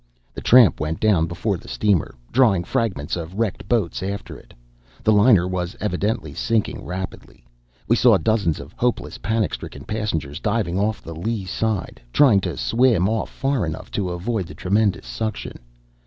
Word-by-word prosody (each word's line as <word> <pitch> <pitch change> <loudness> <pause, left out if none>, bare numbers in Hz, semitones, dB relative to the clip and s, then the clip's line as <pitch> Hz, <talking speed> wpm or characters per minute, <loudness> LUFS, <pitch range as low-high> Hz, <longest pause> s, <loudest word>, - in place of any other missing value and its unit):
The - - -7
tramp 120 - +6
went 75 +1 -2
down 95 -7 +3
before 90 +4 -2
the - - -15
steamer, 100 -6 0 0.2
drawing 110 -8 +4
fragments 90 -5 -1
of 85 +1 -6
wrecked 110 -3 -2
boats 110 -10 0
after 100 +1 -5
it. - - -15 0.5
The 110 - +4
liner 105 -4 +5
was 90 -1 -3
evidently 105 +2 -2
sinking 115 -3 -1
rapidly. 90 -8 -7 0.4
We - - +4
saw - - +5
dozens 105 -8 +1
of - - -10
hopeless, 125 0 -1
panic 110 -2 0
stricken - - -7
passengers 85 -9 -3
diving 100 -4 0
off 105 +2 -1
the 80 - -7
lee 100 +4 -3
side, 110 +1 -2
trying 125 - +5
to 90 -6 -4
swim 110 - +3
off 110 +1 -1
far 135 -3 -1
enough 80 -1 -5
to 95 -3 -2
avoid 95 +2 -2
the - - -10
tremendous 100 +2 +1
suction. 110 -1 -4
100 Hz, 165 wpm, -22 LUFS, 90-110 Hz, 0.5 s, tramp